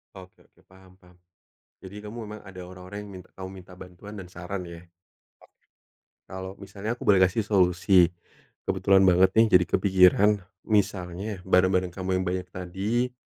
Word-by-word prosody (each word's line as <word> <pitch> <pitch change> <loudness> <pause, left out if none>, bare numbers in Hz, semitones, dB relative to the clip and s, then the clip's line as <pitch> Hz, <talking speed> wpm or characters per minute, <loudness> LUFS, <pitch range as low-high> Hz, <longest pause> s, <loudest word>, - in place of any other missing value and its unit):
Oke 95 -1 -14
oke, - - -29
paham 95 0 -20
paham. 90 -1 -23 0.7
Jadi, 100 +2 -9
kamu 105 +2 -9
memang 105 0 -9
ada 95 -2 -10
orang-orang 95 +3 -9
yang 100 - -12
mint 90 -1 -11
kamu 95 0 -7
minta 90 0 -16
bantuan 90 +4 -11
dan 95 - -8
saran, 90 +1 -7
ya? 85 -1 -10
Oke. 90 - -22 1.3
Kalau 95 0 -8
misalnya 100 +4 -6
aku - - -10
boleh 100 -2 +4
kasih 95 +4 +3
solusi. 90 -2 +4 0.6
Kebetulan 95 +1 +3
banget 95 0 +5
nih 110 0 +6
jadi 90 - 0
kepikiran, 95 +1 +5 0.3
misalnya 100 -2 -2
barang-barang 90 -1 +2
kamu 95 +1 -6
yang - - -1
banyak 90 0 -3
tadi, 100 +8 -2
95 Hz, 160 wpm, -26 LUFS, 90-100 Hz, 1.3 s, nih